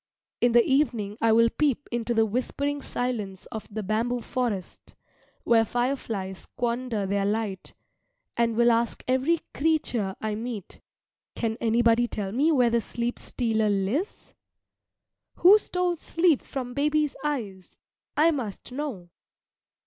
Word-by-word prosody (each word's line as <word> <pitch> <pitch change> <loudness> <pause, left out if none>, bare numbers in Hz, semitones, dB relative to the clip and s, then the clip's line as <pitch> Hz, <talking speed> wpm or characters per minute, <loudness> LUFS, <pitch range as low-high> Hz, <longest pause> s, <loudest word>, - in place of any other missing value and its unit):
In 240 -1 +3
the 235 -1 +6
evening 235 -7 +1
I 230 - +4
will 230 +1 +5
peep 290 -2 +1
into 235 0 -1
the 225 0 +4
whispering 280 +6 -2
silence 215 -8 -3
of 220 -3 -6
the 215 +1 -4
bamboo 230 +4 -1
forest, 225 -6 -4 0.5
where 230 -1 +4
fireflies 225 -6 -2
squander 235 -3 -2
their 200 +1 0
light, 205 -1 -2 0.6
and 235 -1 +1
will 235 +1 +5
ask 230 0 0
every 265 +6 +2
creature 255 -11 0
I 215 -1 -2
meet, 220 -2 -6 0.5
"Can 225 -2 -1
anybody 235 +1 +3
tell 200 -4 -3
me 285 +9 +2
where 250 -6 +3
the 235 0 +2
Sleep 235 +3 -3
stealer 220 -3 0
lives?" 205 - -2 1.0
Who 400 +4 +7
stole 360 -3 -1
sleep 330 -2 +2
from 250 -3 -5
baby's 300 +1 +1
eyes? 215 -11 -4 0.4
I 320 +3 +5
must 250 -7 -5
know. 250 -11 -5
235 Hz, 135 wpm, -26 LUFS, 215-270 Hz, 1.0 s, Who